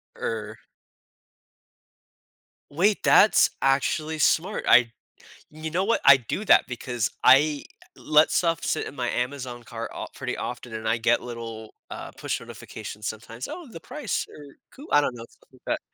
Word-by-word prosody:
Er. 110 -1 -4 2.1
Wait, 195 +7 +1
that's 210 - +6
actually 155 +3 0
smart. 180 +7 +1
I 120 -1 +6 0.6
you 155 +1 -7
know 180 +3 0
what, 230 +4 +1
I 140 - +9
do 130 - -4
that - - +5
because 120 -2 -3
I 145 +2 +5 0.3
let 150 +1 +3
stuff 165 -2 +1
sit - - -1
in - - -10
my 125 -3 -2
Amazon 125 -1 -4
cart 115 0 -7
of - - -6
pretty - - -4
often, 120 -1 -6
and 110 0 -5
I 115 +1 +2
get 115 +1 +2
little, 115 -2 -8 0.2
uh, - - -7
push - - -4
notifications 105 +1 -8
sometimes. 115 +3 -7
"Oh, 350 -4 -8
the 185 - -9
price," 245 - -4
or 145 -2 -13 0.2
"cou" 285 - -13
I 145 - +6
don't 130 -3 -2
know, 115 -1 -9
stuff - - -27
like - - -21
that. - - 0
130 Hz, 160 wpm, -25 LUFS, 115-155 Hz, 2.1 s, I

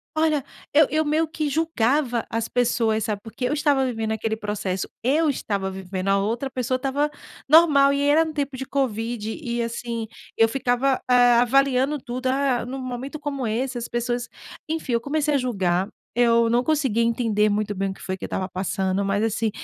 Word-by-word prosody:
olha, 310 -3 +1 0.3
eu 300 0 +6
eu 310 +1 +2
meio 310 +2 +1
que 305 -1 -2
julgava 275 -5 +1
as 225 0 -2
pessoas, 230 -3 +1
sabe. 210 -2 -2
Porque 230 +3 -5
eu - - 0
estava 290 -3 +2
vivendo 225 -3 -2
aquele 220 0 -1
processo, 205 -3 -3 0.2
eu 300 +5 +2
estava 200 -6 -3
vivendo, 190 0 -4
a 195 - +3
outra 230 +7 -1
pessoa 255 0 -1
estava 275 +3 0 0.4
normal 295 -4 +6
e 280 0 0
era 300 +3 +4
no 315 - -5
tempo 280 -2 -2
de 265 +1 -5
covid. 230 -4 -2
E, 235 -3 -2
assim, 230 -1 -4 0.3
eu 225 - +5
ficava, 255 +2 0
ah, 245 -1 +6
avaliando 275 +3 +2
tudo, 255 0 -4
ah, 265 -2 +1
num 265 +2 -5
momento 255 +3 -5
como 280 -4 -3
esse 245 +3 -2
as 235 - -5
pessoas 240 0 -2 0.4
enfim. 315 -5 -3
Eu 235 - +2
comecei 300 +2 0
a 280 - +4
julgar, 190 -7 0 0.3
eu 235 -1 +4
não 240 +2 +2
conseguia 270 -7 +1
entender 225 -2 +1
muito 205 0 -1
bem 195 0 -2
o 190 - -4
que - - -16
foi 185 - -3
que - - -13
eu - - -3
estava 185 - -3
passando, 190 +1 -1
mas, 200 +2 0
assim, 225 0 0
245 Hz, 195 wpm, -23 LUFS, 220-280 Hz, 0.4 s, eu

